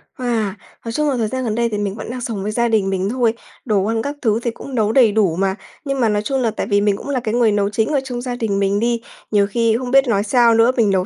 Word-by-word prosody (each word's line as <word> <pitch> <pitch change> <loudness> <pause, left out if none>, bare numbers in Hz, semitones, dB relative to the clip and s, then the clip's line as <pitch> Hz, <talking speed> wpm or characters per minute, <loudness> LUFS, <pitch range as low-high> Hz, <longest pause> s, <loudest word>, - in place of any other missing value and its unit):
À, 225 -5 -1 0.3
nói 230 - -3
chung 300 +4 0
là 260 - 0
thời 220 -2 0
gian 260 +2 -3
gần 220 -2 -1
đây 235 0 +1
thì 210 - -3
mình 200 -1 -2
vẫn 220 - -7
đang 250 0 -5
sống 215 -5 -4
với 210 - -2
gia 235 +2 +1
đình 210 -4 +1
mình 190 +1 -1
thôi, 235 -2 +1 0.3
đồ 205 -4 +1
ăn 225 0 0
các 285 +3 -4
thứ 220 -2 +1
thì 235 - 0
cũng 260 +3 -9
nấu 215 -1 +2
đầy 235 -4 +5
đủ 200 -6 +2
mà. 190 +1 0 0.3
Nhưng 275 -1 -2
mà 230 -3 +3
nói 205 0 +1
chung 265 +4 -1
là 225 -2 +1
tại - - -4
vì 205 -2 +2
mình 205 -1 +1
cũng 285 - -8
là 265 -3 0
cái 220 -1 -3
người 235 -3 +3
nấu 205 -1 +1
chính 220 +4 0
ở 280 - +3
trong 245 -2 -5
gia 250 -1 -4
đình 210 -4 -1
mình 200 +1 +1
đi, 235 0 0 0.3
nhiều 200 -1 +3
khi 225 +1 +1
không 250 -1 -5
biết 270 -1 +5
nói 205 -3 +1
sao 235 +1 +4
nữa, 230 +2 +4
mình 220 -3 +3
nấu 190 -1 +1
225 Hz, 310 wpm, -19 LUFS, 205-245 Hz, 0.3 s, đầy